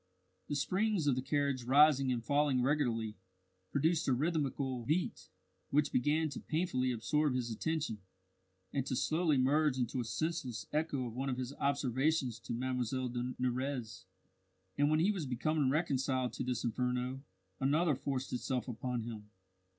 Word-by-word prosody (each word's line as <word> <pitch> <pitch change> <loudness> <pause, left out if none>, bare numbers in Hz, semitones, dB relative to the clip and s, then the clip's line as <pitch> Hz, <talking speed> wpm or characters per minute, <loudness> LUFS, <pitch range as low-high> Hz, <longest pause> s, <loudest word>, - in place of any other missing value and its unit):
The 145 - -2
springs 190 +4 +1
of 145 - +4
the 130 - -1
carriage 140 -1 0
rising 135 +1 +5
and 120 -2 -2
falling 140 -1 +2
regularly, 120 -6 0 0.5
produced 160 +3 +2
a 135 - +4
rhythmical 135 -3 -1
beat, 155 +8 -1 0.4
which 145 +1 +2
began 150 +5 +2
to 140 - -6
painfully 140 -6 0
absorb 145 +4 +1
his 120 -2 -1
attention, 155 -2 -2 0.7
and 140 - +1
to 130 - -1
slowly 155 +2 +2
merge 140 +2 +3
into 125 +1 -1
a - - 0
senseless 135 -2 -2
echo 150 -4 0
of 115 - -5
one 135 +3 -2
of 125 - -1
his 130 +1 -4
observations 135 -2 0
to 115 - -8
Mlle 125 +1 -1
de 125 +1 -3
Nurrez. 125 -2 -2 0.7
And 145 +5 +3
when 155 0 +3
he 195 +5 +4
was 180 -8 -3
becoming 140 +3 +1
reconciled 135 -4 0
to - - -3
this 125 -2 -2
inferno, 125 +2 -1 0.4
another 150 +4 +3
forced 135 -1 -3
itself 125 0 -2
upon 125 0 -3
him. 110 -2 -7
135 Hz, 155 wpm, -34 LUFS, 125-150 Hz, 0.7 s, rising